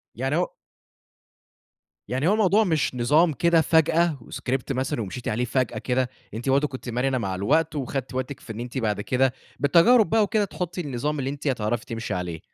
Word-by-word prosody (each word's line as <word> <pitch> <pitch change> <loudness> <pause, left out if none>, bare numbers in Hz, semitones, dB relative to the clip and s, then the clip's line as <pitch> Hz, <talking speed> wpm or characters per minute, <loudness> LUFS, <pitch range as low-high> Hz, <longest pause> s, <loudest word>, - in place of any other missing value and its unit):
يعني 135 +5 -1
هو 180 - 0 1.6
يعني 130 +6 0
هو 205 - +4
الموضوع 215 0 +4
مش 160 -8 0
نظام 150 +7 +3
كده 170 +1 +3
فجأة 160 0 +3
وscript 130 +2 -3
مثلًا 130 -1 -1
ومشيتِ 110 +4 -6
عليه 120 +3 0
فجأة 130 0 -1
كده. 125 0 0 0.2
أنتِ 120 +5 -3
برضه 140 +2 +3
كنتِ 130 -2 -8
مرنة 130 +2 0
مع 95 -5 -2
الوقت 150 - +1
وخدتِ 135 -1 -3
وقتِك 130 +1 -4
في 115 - -8
إن 110 - -8
أنتِ 120 +1 -5
بعد 105 -4 0
كده، 130 +3 +1 0.3
بالتجارب 175 - +5
بقى 220 -1 +4
وكده، 210 0 +1
تحطّي 180 -1 -4
النظام 145 +1 -2
اللي 135 0 -2
أنتِ 145 +1 -5
هتعرفي 120 -2 -1
تمشي 115 -1 -4
عليه. 90 -3 -4
135 Hz, 180 wpm, -25 LUFS, 120-160 Hz, 1.6 s, بالتجارب